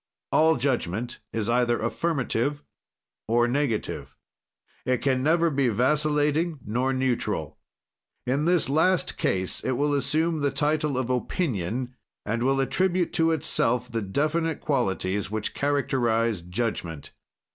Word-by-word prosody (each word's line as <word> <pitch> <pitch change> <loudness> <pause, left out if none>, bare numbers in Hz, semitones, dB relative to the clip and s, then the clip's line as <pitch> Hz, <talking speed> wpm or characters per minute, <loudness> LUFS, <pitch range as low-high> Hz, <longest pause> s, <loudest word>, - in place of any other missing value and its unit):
"All 160 +1 +4
judgment 120 -3 -1
is 110 -2 -2
either 120 0 +2
affirmative 140 +2 -1 0.6
or 120 +2 +3
negative. 125 -4 -2 0.7
"It 125 0 +1
can 130 -2 +2
never 165 +3 +3
be 140 -2 +1
vascillating 150 - +1
nor 125 +5 0
neutral. 130 -2 -1 0.7
"In 140 +4 0
this 175 -3 +3
last 160 +6 +2
case 95 -1 -1
it 130 - 0
will 145 +3 +1
assume 155 +4 +1
the 145 -1 +1
title 150 0 0
of 130 -1 -1
opinion, 125 - -2 0.3
and 115 +3 -1
will 135 +2 +2
attribute 180 +6 +1
to 165 0 +3
itself 125 -6 +1
the 115 -1 -1
definite 155 - 0
qualities 100 -7 -1
which 110 0 -3
characterize 120 -7 +1
judgment. 90 -5 -4
130 Hz, 125 wpm, -26 LUFS, 115-150 Hz, 0.7 s, All